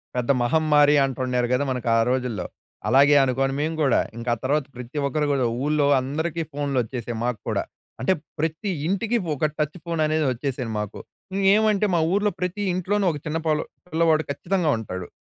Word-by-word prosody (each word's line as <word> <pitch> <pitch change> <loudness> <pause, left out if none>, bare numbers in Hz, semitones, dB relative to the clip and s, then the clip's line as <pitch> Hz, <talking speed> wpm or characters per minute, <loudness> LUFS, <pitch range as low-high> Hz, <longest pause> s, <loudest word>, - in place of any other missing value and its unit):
పెద్ద 125 +1 +1
మహమ్మారి 150 +2 +4
అంటుండారు 125 -2 -1
కదా! 125 +3 +2
మనకు 125 -2 -3
ఆ - - +4
రోజుల్లో. 125 -7 -1 0.4
అలాగే 140 +2 +6
అనుకోని 135 +1 0
మేము 160 +2 -1
కూడా, 135 -4 +3 0.2
ఇంకా 120 +1 -2
ఆ - - -12
తర్వాత 145 +2 +1
ప్రతి 125 +3 -8
ఒక్కరు 150 +2 0
కూడా, 135 -3 +1 0.2
ఊర్లో 150 -1 +2
అందరికీ 160 +5 -2
ఫోన్‌లు 140 -2 -2
వచ్చేసాయి 120 0 -5
మాకు 120 -3 -1
కూడా. - - 0 0.4
అంటే 130 - +3 0.3
ప్రతి 160 +6 -2 0.2
ఇంటికి 210 +6 0 0.2
ఒక 150 +2 0
టచ్ 150 +3 -1
ఫోన్ 165 -2 -1
అనేది 155 0 +1
వచ్చేసింది 125 -1 -3
మాకు. 105 0 -5 0.4
ఇంగేమంటే 205 +1 +3
మా - - +3
ఊర్లో 205 +1 +2
ప్రతి 180 +3 -2
ఇంట్లోనూ 195 +3 0
ఒక 150 - -5
చిన్న 155 +1 -1
పొల్ల 155 -1 +2 0.3
పిల్లవాడు 160 -1 +3
ఖచ్చితంగా 170 +2 0
ఉంటాడు. 95 -5 -6
145 Hz, 170 wpm, -24 LUFS, 125-165 Hz, 0.4 s, అలాగే